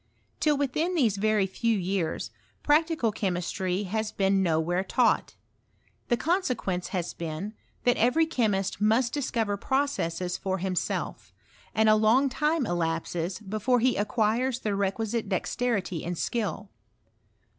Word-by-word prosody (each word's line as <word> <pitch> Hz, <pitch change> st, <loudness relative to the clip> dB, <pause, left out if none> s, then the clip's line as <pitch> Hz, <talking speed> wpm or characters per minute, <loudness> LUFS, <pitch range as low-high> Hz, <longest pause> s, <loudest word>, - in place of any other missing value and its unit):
Till 300 Hz, -2 st, +2 dB
within 305 Hz, +6 st, 0 dB
these 230 Hz, -, +2 dB
very 215 Hz, -1 st, +2 dB
few 225 Hz, +4 st, 0 dB
years, 185 Hz, -3 st, -2 dB, 0.3 s
practical 310 Hz, -5 st, +2 dB
chemistry 185 Hz, -1 st, -2 dB
has 215 Hz, +2 st, -2 dB
been 195 Hz, 0 st, +2 dB
nowhere 175 Hz, +1 st, +1 dB
taught. 235 Hz, +5 st, +1 dB, 0.7 s
The 240 Hz, -, +2 dB
consequence 250 Hz, -, -1 dB
has 180 Hz, -3 st, -3 dB
been, 170 Hz, +5 st, -5 dB, 0.3 s
that 245 Hz, -, +3 dB
every 250 Hz, +8 st, +3 dB
chemist 210 Hz, -, 0 dB
must 230 Hz, +3 st, +3 dB
discover 225 Hz, -7 st, -1 dB
processes 185 Hz, -10 st, -1 dB
for 190 Hz, -1 st, -1 dB
himself; 185 Hz, -1 st, -3 dB, 0.4 s
and 220 Hz, 0 st, +4 dB
a 215 Hz, -, +7 dB
long 220 Hz, +6 st, +4 dB
time 300 Hz, +2 st, +1 dB
elapses 170 Hz, 0 st, -2 dB
before 215 Hz, +5 st, +1 dB
he 250 Hz, +2 st, +2 dB
acquires 225 Hz, +4 st, +1 dB
the 210 Hz, -, -1 dB
requisite 205 Hz, +2 st, -1 dB
dexterity 190 Hz, -3 st, -1 dB
and 175 Hz, 0 st, -3 dB
skill. 210 Hz, -2 st, -2 dB
215 Hz, 125 wpm, -27 LUFS, 185-245 Hz, 0.7 s, a